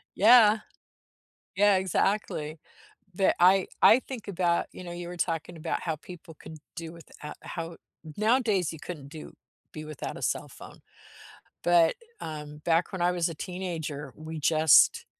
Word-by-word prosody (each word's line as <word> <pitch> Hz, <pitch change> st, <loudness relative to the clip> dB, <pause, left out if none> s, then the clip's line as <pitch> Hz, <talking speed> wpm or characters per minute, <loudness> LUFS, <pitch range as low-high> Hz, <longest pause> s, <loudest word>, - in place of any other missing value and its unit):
Yeah. 220 Hz, 0 st, +6 dB, 1.0 s
Yeah, 205 Hz, 0 st, +4 dB
exactly. 185 Hz, -4 st, -1 dB, 0.6 s
The 195 Hz, -, +3 dB
I 190 Hz, +1 st, +5 dB
I 240 Hz, -, +7 dB
think 245 Hz, -6 st, -8 dB
about, 175 Hz, -3 st, 0 dB
you 185 Hz, -, -10 dB
know, 175 Hz, -, -7 dB
you 175 Hz, 0 st, -6 dB
were 175 Hz, 0 st, -8 dB
talking 165 Hz, 0 st, -3 dB
about 155 Hz, -, -3 dB
how 160 Hz, -2 st, -2 dB
people 170 Hz, -1 st, -12 dB
could 160 Hz, -, -11 dB, 0.2 s
do 165 Hz, -1 st, -6 dB
with 170 Hz, -, -14 dB, 0.2 s
a 150 Hz, -, -6 dB
how 165 Hz, -1 st, -7 dB, 0.4 s
nowadays 215 Hz, -, +1 dB
you 160 Hz, -, -10 dB
couldn't 150 Hz, -6 st, -8 dB
do 155 Hz, 0 st, -10 dB, 0.4 s
be 155 Hz, 0 st, -7 dB
without 155 Hz, -3 st, -6 dB
a -, -, -10 dB
cell -, -, -1 dB
phone. -, -, -13 dB, 0.8 s
But, 170 Hz, -1 st, +4 dB, 0.3 s
um, 150 Hz, -1 st, -7 dB
back 170 Hz, +2 st, +2 dB
when 185 Hz, -, -4 dB
I 175 Hz, -, +3 dB
was 175 Hz, -1 st, 0 dB
a 165 Hz, -, -7 dB
teenager, 160 Hz, -6 st, -5 dB
we 155 Hz, 0 st, -7 dB
just, 155 Hz, 0 st, +5 dB
170 Hz, 160 wpm, -27 LUFS, 155-190 Hz, 1.0 s, I